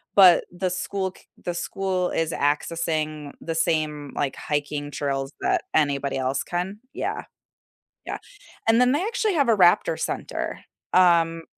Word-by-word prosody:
but 185 -3 +8
the 185 +1 -2
school 190 +1 -2
c - - -19 0.2
the 175 - -2
school 185 +1 -1
is 165 0 0
accessing 155 0 -1
the 165 - -4
same, 155 -3 0
like, 140 -2 -1
hiking 145 0 -3
trails 135 -1 -2
that 370 -1 +1
anybody 140 -2 +1
else 130 +1 0
can. 180 +4 -3
Yeah. - - -3 0.8
Yeah, - - -4 0.5
and 225 +2 +5
then 250 - +5
they 290 +5 +1
actually 440 -3 0
have 285 -4 +3
a 225 - +6
raptor 175 -2 +4
center. - - -3 0.3
Um 165 -2 +4
165 Hz, 145 wpm, -24 LUFS, 145-190 Hz, 0.8 s, but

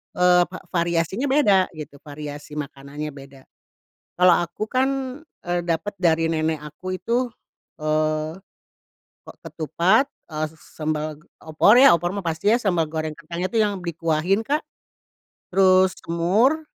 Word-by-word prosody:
eee, 180 0 +5
va 185 - -9
variasinya 170 - 0
beda, 210 -10 +4
gitu, 150 -2 -9
variasi 145 0 -9
makanannya 145 +1 -6
beda. 135 -1 -13 0.8
Kalau 180 0 +6
aku 175 +5 -5
kan, 260 +2 +2 0.6
eee, 175 0 0
dapat 175 +5 -2
dari 165 -2 +2
nenek 160 -1 -1
aku 185 +5 -6
itu, 245 +4 0 0.5
eee, 155 0 0 0.9
ke - - -9 0.2
ketupat, 180 - +2 0.2
eee, 155 0 -2
s - - -20 0.2
sambal 155 -1 -2
g - - -22 0.2
opor 160 +7 +4
ya. 270 -4 +8
Opor 175 +2 -2
mah 200 - -3
pasti 165 +5 0
ya, 235 - +4
sambal 175 -5 +1
goreng 155 -1 -3
kacangnya 170 +3 -4
tuh 230 - +1
yang 205 -2 0
dikuahin 165 +4 0
Kak, 295 +3 0 0.9
terus 185 0 +4
semur, 205 - +1
170 Hz, 140 wpm, -23 LUFS, 155-190 Hz, 0.9 s, ya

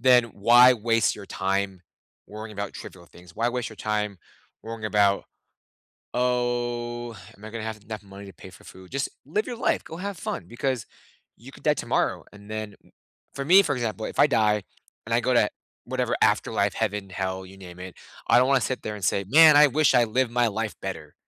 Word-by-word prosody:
then 125 -1 +6
why 120 +3 +6
waste 115 -1 +1
your 100 -2 -10
time 95 0 -2 0.5
worrying 110 +1 -8
about 100 0 -5
trivial 85 -2 -10
things? 90 +1 -17
Why 115 +1 0
waste 125 -1 -3
your 110 - -12
time 105 -3 -2 0.4
worrying 115 -1 -7
about, 100 -2 +2 0.9
"Oh, 120 -1 -1 0.2
am 100 - -15
I 110 - -8
gonna 115 0 -6
have 110 -1 -5
enough 110 -1 -7
money 100 0 -12
to 95 - -11
pay 95 - -12
for 95 - -17
food?" 95 -1 -14
Just 135 0 -2 0.2
live 210 +9 -1
your 245 -2 -5
life, - - 0
go 160 - -9
have 200 -2 -5
fun 85 - -5
because 125 -2 -2 0.5
you - - -14
could - - -15
die - - +4
tomorrow, - - -1
and 105 0 -14
then 110 -1 -5 0.6
for 140 - -4
me, 185 +7 +7
for 145 -6 -1
example, 110 -3 -3
if - - -8
I 145 - +7
die 105 -5 +2 0.4
and 115 - -1
I 120 - +3
go 125 +1 +1
to 105 -3 +4 0.4
whatever - - -1
afterlife, - - +2
heaven, 100 -2 -2
hell, 95 0 -4
you 95 +1 -14
name 90 -2 -11
it, 90 -1 -8 0.3
I - - +6
don't 125 +2 +3
wanna 135 -2 +4
sit 130 - -2
there 105 - -4
and 100 - -6
say, 100 - +1
"Man, 155 +3 +8
I 150 0 +8
wish 150 0 +3
I 125 - +6
lived 120 +2 0
my 120 -1 +2
life 110 +1 -3
better, - - -6
110 Hz, 205 wpm, -25 LUFS, 100-125 Hz, 0.9 s, Man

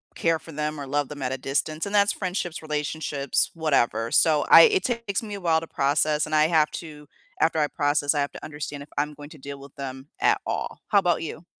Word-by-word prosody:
care 165 -1 +1
for 165 - -12
them 150 0 -3
or 140 - -6
love 145 0 0
them 145 -2 -8
at 130 - -1
a 130 - -2
distance, 145 +5 -1
and 200 - -6
that's 200 0 +4
friendships, 180 -3 -3
relationships, 150 -2 -1
whatever. 135 -8 +1
So 155 -2 +4
I - - +10
it 420 -5 +4
takes 230 -4 -2
me 210 -2 -6
a 200 - -8
while 165 -2 +3
to 165 - -8
process, 150 +2 +1
and 155 - -2
I 155 0 +5
have 155 -2 +3
to 150 -3 -9 0.3
after 160 0 +2
I 150 - +2
process, 145 0 +1
I 145 - -1
have 140 - -2
to - - -10
understand 150 -1 -6
if 145 - -17
I'm 150 +1 0
going 145 0 -11
to 155 - -13
deal 140 0 -8
with 140 0 -13
them 135 0 -7
at - - +3
all. - - -4
How 205 - +5
about 175 -4 +1
you? 165 +1 -7
150 Hz, 240 wpm, -25 LUFS, 145-165 Hz, 0.3 s, I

